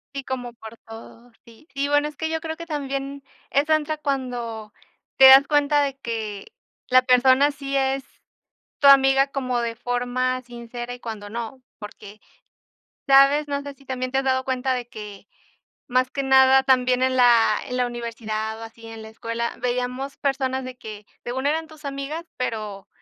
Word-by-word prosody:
Sí 275 - -4
como 245 -2 -5
por 225 0 -12
todo, 230 +2 -13
sí. 235 +7 -19
Sí, 280 +1 -1
bueno, 290 +1 +2
es 300 - -9
que 320 +1 -3
yo 320 0 -2
creo 320 0 -5
que 335 0 -10
también, 275 -2 -4 0.3
esa 295 +3 +2
entra 310 0 -2
cuando 245 -7 -4 0.5
te 265 - +8
das 270 +1 +9
cuenta 290 0 +3
de 275 -1 -2
que 220 -5 -6 0.3
la 255 0 +5
persona 260 +2 +4
sí 275 -1 -5
es 270 0 0 0.8
tu 285 -3 +5
amiga 270 0 +6
como 255 -3 -2
de 230 -1 -3
forma 245 +1 -2
sincera 240 0 -8
y 245 - -9
cuando 210 -3 -7
no, 235 +3 -6 0.2
porque 210 -1 -11 0.9
sabes, 275 +2 +5
no 285 0 -2
sé 285 0 -8
si 275 0 -23
también 255 0 -4
te 265 - 0
has 270 - 0
dado 260 0 +1
cuenta 260 0 -1
de 245 -1 -3
que, 210 - -10 0.6
más 255 +1 +1
que 275 - -2
nada, 265 0 +5
también 255 -1 +2
en 260 0 +1
la 235 -3 +5
en 250 - -4
la 250 -1 +1
universidad 220 -2 -5
o - - -8
así 225 0 -12
en 225 -1 -9
la 220 - -10
escuela 230 +1 -4
veíamos 250 +2 -3
personas 265 -1 -1
de 255 0 -8
que 210 -3 -10 0.2
según 260 +3 -2
eran 320 +2 0
tus 310 -1 -15
amigas, 280 +4 -5
pero 215 -5 -4
255 Hz, 180 wpm, -23 LUFS, 235-275 Hz, 0.9 s, das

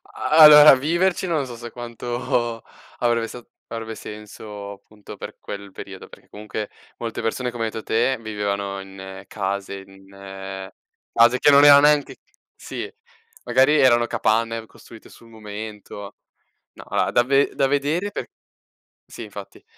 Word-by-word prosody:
A - - -4
allora 150 -2 +10
viverci 170 +7 0
non 155 -5 0
so 120 -2 -9
se 120 0 -9
quanto 120 0 -3 0.4
avrebbe 115 -1 +1
sa 120 0 -10 0.3
avrebbe 115 -1 -5
senso 105 -1 -9
appunto 100 +1 -13
per - - -9
quel 100 -1 -8
periodo, - - -10
perché - - -17
comunque 105 0 -7 0.3
molte 115 -1 -5
persone 125 +2 -2
come 115 -1 -3
hai - - -1
detto 110 - -7
te 120 +3 +1
vivevano 100 -2 -3
in 95 0 -10
case 100 -1 -4
in 95 0 -10 0.4
case 120 +2 +5
che 145 - +5
non 140 +1 +7
erano 140 0 +9
neanche 150 -1 +3 0.4
sì, 430 - -7 0.5
magari 130 +5 +3
erano 120 -2 +4
capanne 115 0 0
costruite 110 +1 -16
sul 115 - -17
momento. 105 -2 -9 0.6
No, - - -12
allora - - -1
da 120 - +3
ve 135 +2 +2
da 135 - +2
vedere 150 +8 -1
per - - -5 0.8
sì, - - -10
infatti - - -11
115 Hz, 145 wpm, -22 LUFS, 105-130 Hz, 0.8 s, allora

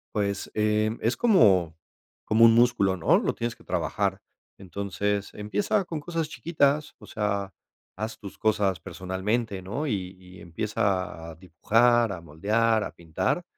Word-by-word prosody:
Pues 100 -2 -1
eh, 110 +1 +1
es 115 - 0
como- 100 - +4 0.5
como 110 +1 +4
un 115 - +7
músculo, 115 -6 +3
¿no? 80 - +4
Lo - - -1
tienes 120 0 -3
que - - -20
trabajar. - - -1 0.4
Entonces, 100 +2 -3
empieza 195 - -1
con 160 -3 -4
cosas 165 0 -3
chiquitas, 150 -2 0
o - - -14
sea, 100 -2 -2 0.4
haz 110 +3 -5
tus 100 -2 -10
cosas 105 -5 +1
personalmente, 95 +4 -3
¿no? 125 +12 -4
Y- 95 -5 -3
y 90 0 -14
empieza 95 -2 -2
a - - -12
dibujar, 115 +7 +2
a 90 -3 -6
moldear, 105 +8 +1
a - - -5
pintar. 85 - -2
105 Hz, 145 wpm, -26 LUFS, 95-115 Hz, 0.5 s, un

